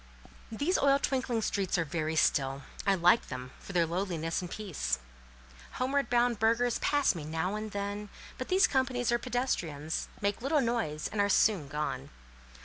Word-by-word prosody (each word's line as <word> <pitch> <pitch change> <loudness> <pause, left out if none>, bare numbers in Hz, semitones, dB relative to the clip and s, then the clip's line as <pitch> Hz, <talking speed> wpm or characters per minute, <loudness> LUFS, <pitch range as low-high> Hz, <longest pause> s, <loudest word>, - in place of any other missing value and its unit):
These 285 - +1
oil 275 0 +5
twinkling 255 -5 -1
streets 195 -3 0
are 170 - +1
very 160 0 -2
still: 135 -2 +2 0.2
I 195 - +5
like 180 +5 +4
them 125 0 -6
for - - -10
their 175 -3 +3
lowliness 170 -1 -2
and 180 - -6
peace. 160 - -2 0.8
Homeward 275 +2 0
bound 240 -2 +2
burghers 230 +2 +2
pass 290 -1 +2
me 165 -4 -6
now 160 +5 -2
and 215 +1 -4
then, 205 +1 -4 0.3
but 255 - -4
these 375 +1 +5
companies 260 -3 +1
are 240 - +2
pedestrians, 170 - -2
make 200 +2 -1
little 285 +4 +2
noise, 230 - -1
and 205 - 0
are 200 - +2
soon 200 -7 +3
gone. 150 +2 -3
205 Hz, 165 wpm, -30 LUFS, 165-245 Hz, 0.8 s, oil